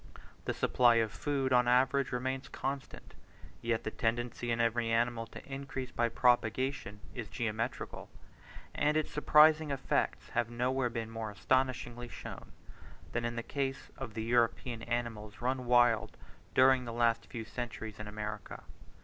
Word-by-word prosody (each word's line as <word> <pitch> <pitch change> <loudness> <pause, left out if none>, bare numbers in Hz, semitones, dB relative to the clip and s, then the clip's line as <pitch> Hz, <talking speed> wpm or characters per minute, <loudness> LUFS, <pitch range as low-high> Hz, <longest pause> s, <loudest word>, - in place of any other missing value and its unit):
The - - 0
supply 120 -2 +4
of 115 -2 +2
food, 135 -2 -1
on 125 -1 +5
an - - +4
average, 135 +1 +2
remains 130 +2 -2
constant, 135 0 -5 0.5
yet 115 -1 0
the 110 - -3
tendency 120 +1 -1
in 115 0 0
every 115 0 +1
animal 115 0 +1
to - - -11
increase 135 -2 -5
by 120 0 +1
propagation 120 -2 +1
is 120 -4 -5
geometrical; 115 +2 -3 0.6
and 150 +1 +2
its 155 - -1
surprising 150 +1 +5
effects 140 -2 -1
have 115 - 0
nowhere 125 +1 0
been 115 -1 -4
more 115 -1 -4
astonishingly 120 +2 0
shown, - - -9 0.6
than 120 0 -1
in 120 0 -2
the 115 - -3
case 135 0 -3
of 125 -5 -7
the 110 - -2
European 120 0 +1
animals 115 -3 -3
run 125 +1 -1
wild 120 -3 +4 0.4
during 130 -1 +6
the 115 - -5
last 115 -1 +2
few 115 -2 -6
centuries 110 -3 -6
in 105 - -6
America. 105 -1 -6
120 Hz, 150 wpm, -32 LUFS, 115-130 Hz, 0.6 s, during